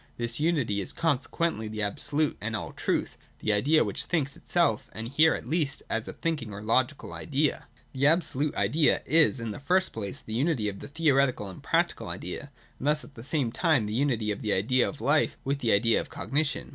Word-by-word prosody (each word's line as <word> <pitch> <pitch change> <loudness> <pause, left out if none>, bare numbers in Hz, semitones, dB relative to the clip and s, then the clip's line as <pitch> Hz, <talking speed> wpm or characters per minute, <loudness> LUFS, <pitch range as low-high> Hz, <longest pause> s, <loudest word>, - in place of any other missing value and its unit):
This 120 +1 -1
unity 140 -11 +1
is 95 - -5
consequently 160 -4 -1
the 105 0 -3
absolute 145 +9 0
and 115 +1 -2
all 100 - -4
truth, - - -1 0.2
the 110 - 0
Idea 145 +10 +4
which - - -3
thinks 145 -5 -1
itself, 170 -8 0
— - - -22
and 110 +1 -5
here 155 +5 +4
at - - -7
least 150 -1 -1
as 115 0 -1
a - - -5
thinking 150 -10 -3
or 100 - -7
Logical 130 +5 0
Idea. 145 -1 -1 0.3
The 135 +1 +2
Absolute 150 -3 +1
Idea 150 0 +2
is, 155 -4 +4
in 115 -1 -4
the - - -7
first 185 +6 +1
place, 100 -3 -3
the 110 - -8
unity 130 -3 +1
of 100 -1 -4
the - - -8
theoretical 140 -8 +1
and 95 - -10
practical - - 0
idea, - - -6 0.3
and 140 - -3
thus 150 0 +2
at 145 - -14
the 115 - -10
same 140 -4 -1
time 155 - +2
the 105 - -4
unity 120 -4 +1
of 105 - -4
the 105 -4 0
idea 125 +7 +2
of 150 - -9
life 145 +2 +2
with 140 +1 -1
the 115 -5 +1
idea 115 +3 +3
of - - -10
cognition. 145 +1 -1
135 Hz, 210 wpm, -28 LUFS, 110-155 Hz, 0.3 s, Idea